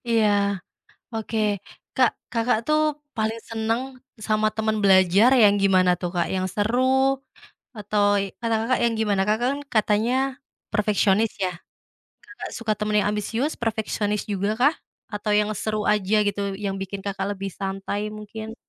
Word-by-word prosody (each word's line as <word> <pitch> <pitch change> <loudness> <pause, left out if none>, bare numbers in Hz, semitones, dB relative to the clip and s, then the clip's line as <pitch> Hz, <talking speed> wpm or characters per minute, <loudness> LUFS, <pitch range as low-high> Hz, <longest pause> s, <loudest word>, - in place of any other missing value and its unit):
Iya. 225 -2 +4 0.9
Oke. 225 0 -3 0.6
Kak, 255 -2 +5 0.2
Kakak 230 0 +2
tuh 305 0 +3 0.4
paling 220 0 -1
seneng 225 +1 -1 0.5
sama 215 0 +2
temen 220 0 0
belajar 190 +3 +6
yang 205 -4 +6
gimana 185 -2 +4
tuh, 175 - -1
Kak? 175 - +1
Yang 185 0 -1
seru, 225 +5 +1 1.0
atau 205 0 0 0.2
ey 195 -1 -4
kata 230 -1 0
Kakak 255 +2 +1
yang 235 -1 +2
gimana? 205 -3 +1
Kakak 220 +3 +1
kan 285 - -4
katanya, 215 +2 +2 0.6
perfeksionis 210 0 +2
ya, 185 - -1 0.7
Kakak 235 +1 -9
suka 230 -3 -1
temen 210 0 -1
yang 205 - 0
ambisius, 225 +8 -1
perfeksionis 215 -2 -1
juga 200 0 0
kah, 285 +5 +4 0.4
atau 210 +1 -3
yang 210 0 +2
seru 215 +1 -2
aja 210 +1 +2
gitu, 200 -1 -1
yang 195 0 -3
bikin 195 +1 -6
Kakak 195 -1 -2
lebih 195 0 -5
santai 195 +2 -3
mungkin? 215 +1 -8
210 Hz, 150 wpm, -24 LUFS, 200-225 Hz, 1.0 s, belajar